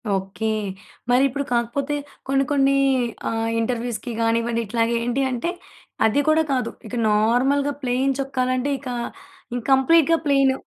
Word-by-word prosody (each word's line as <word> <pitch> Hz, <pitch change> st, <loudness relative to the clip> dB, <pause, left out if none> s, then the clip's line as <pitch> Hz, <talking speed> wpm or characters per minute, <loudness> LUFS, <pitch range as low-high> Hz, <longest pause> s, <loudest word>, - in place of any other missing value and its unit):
Okay. 195 Hz, +3 st, -4 dB, 0.7 s
మరిప్పుడు 270 Hz, +2 st, +2 dB
కాకపోతే 240 Hz, +5 st, -1 dB, 0.3 s
కొన్నికొన్ని 275 Hz, 0 st, +2 dB, 0.6 s
ఆహ్, 225 Hz, 0 st, -1 dB
ఇంటర్వ్యూ‌స్‌కి 240 Hz, 0 st, -2 dB
గానివ్వండి 230 Hz, +1 st, +1 dB
ఇట్లాగా 230 Hz, +2 st, 0 dB
ఏంటి 245 Hz, +3 st, 0 dB
అంటే 250 Hz, +8 st, -2 dB, 0.6 s
అది 220 Hz, +6 st, +3 dB
కూడా 315 Hz, +1 st, +4 dB
కాదు. 255 Hz, -3 st, 0 dB, 0.2 s
ఇక 250 Hz, -, -6 dB
నార్మల్‌గా 250 Hz, +7 st, +2 dB
ప్లేన్ 260 Hz, +2 st, +1 dB
చొక్కాలంటే 255 Hz, 0 st, -1 dB
ఇకా 255 Hz, -3 st, -5 dB, 0.6 s
ఇం -, -, -1 dB
కంప్లీట్‌గాప్లేన్ 280 Hz, -1 st, +4 dB
255 Hz, 115 wpm, -22 LUFS, 230-275 Hz, 0.7 s, కూడా